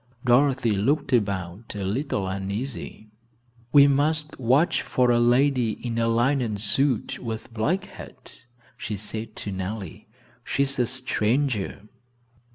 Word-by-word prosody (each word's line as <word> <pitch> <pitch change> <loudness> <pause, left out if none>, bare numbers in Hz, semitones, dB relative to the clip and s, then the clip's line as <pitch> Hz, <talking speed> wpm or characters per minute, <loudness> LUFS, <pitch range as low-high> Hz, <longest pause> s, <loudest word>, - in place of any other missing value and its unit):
Dorothy 130 -1 +3
looked 120 +9 0
about 100 -2 -1
a 100 - -4
little 100 0 -2
uneasily. 105 +3 -5 0.6
"We 140 0 +8
must 150 +2 0
watch 130 +7 +3
for 125 -1 +1
a 120 - +3
lady 120 -1 +3
in 115 0 -4
a 115 - +2
linen 120 -1 +1
suit 115 +4 +1
with 115 -1 -6
black 155 - 0
hat," - - -12 0.3
she 105 - -4
said 110 +2 -4
to 100 - -4
Nellie; 95 +1 -6 0.4
"she's 135 +1 -1
a 120 - +2
stranger." 125 -3 -1
120 Hz, 125 wpm, -25 LUFS, 105-135 Hz, 0.6 s, We